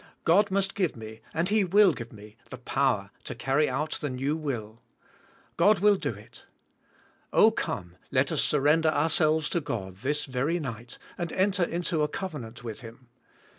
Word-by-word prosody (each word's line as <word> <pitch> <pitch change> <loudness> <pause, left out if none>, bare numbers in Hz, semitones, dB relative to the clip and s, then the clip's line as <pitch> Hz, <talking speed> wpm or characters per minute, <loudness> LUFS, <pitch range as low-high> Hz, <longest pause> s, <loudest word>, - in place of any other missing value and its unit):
God 200 +5 +4
must 195 0 0
g"ive 185 -5 0
me, 110 -1 -10
and 165 +3 -1
He 215 0 +3
will 195 0 +5
g"ive 120 -4 -8
me, 105 -1 -13
the 130 - -7
power 125 -5 0
to - - -6
carry 135 +6 +1
out 150 +4 -2
the 145 - -2
new 135 +4 -1
will. 120 -8 -5 0.8
God 210 +1 +5
will 205 +2 +5
do - - -3
it. - - -15 0.9
Oh 220 - +6
come, 90 - -4
let - - +1
us - - +2
surrender 155 +3 +3
ourselves 155 0 +2
to 170 - 0
God 95 -9 -5
this 145 +7 -1
very 140 +6 -1
night, 120 -5 -7 0.2
and 170 -2 -3
enter 190 0 +1
into 170 -1 0
a 150 - +2
covenant 145 -10 -6
with 115 -3 -6
Him. 120 +1 -13
150 Hz, 170 wpm, -27 LUFS, 120-175 Hz, 0.9 s, Oh